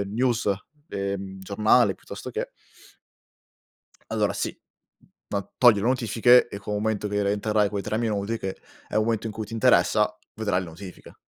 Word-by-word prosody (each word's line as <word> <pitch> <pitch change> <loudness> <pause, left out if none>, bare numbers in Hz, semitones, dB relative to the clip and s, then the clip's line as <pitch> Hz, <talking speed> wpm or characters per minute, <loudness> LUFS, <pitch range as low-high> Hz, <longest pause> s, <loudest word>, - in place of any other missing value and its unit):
eh 100 - 0
news, 115 -1 +1 0.4
ehm, 100 -1 -4
giornale 100 +3 +3
piuttosto - - -9
che - - -4 1.6
Allora - - +1
sì, - - -3 0.7
no, 100 -1 -4
togli 120 -4 +7
le - - -1
notifiche 120 0 +4
e 100 - -7
con 105 +1 -5
un 105 - -1
momento 110 -1 -1
che 105 0 0
rientrerai 105 +1 +1
quei 100 -1 -3
3 110 +1 -2
minuti 110 -1 -1
che 95 -1 -4 0.3
è - - -7
un 110 - +3
momento 115 -1 -1
in 110 - -4
cui 110 0 -5
ti 105 - -13
interessa 115 - +3 0.2
vedrai 105 -4 0
le 90 - -6
notifiche. 90 +3 -11
105 Hz, 170 wpm, -25 LUFS, 100-110 Hz, 1.6 s, togli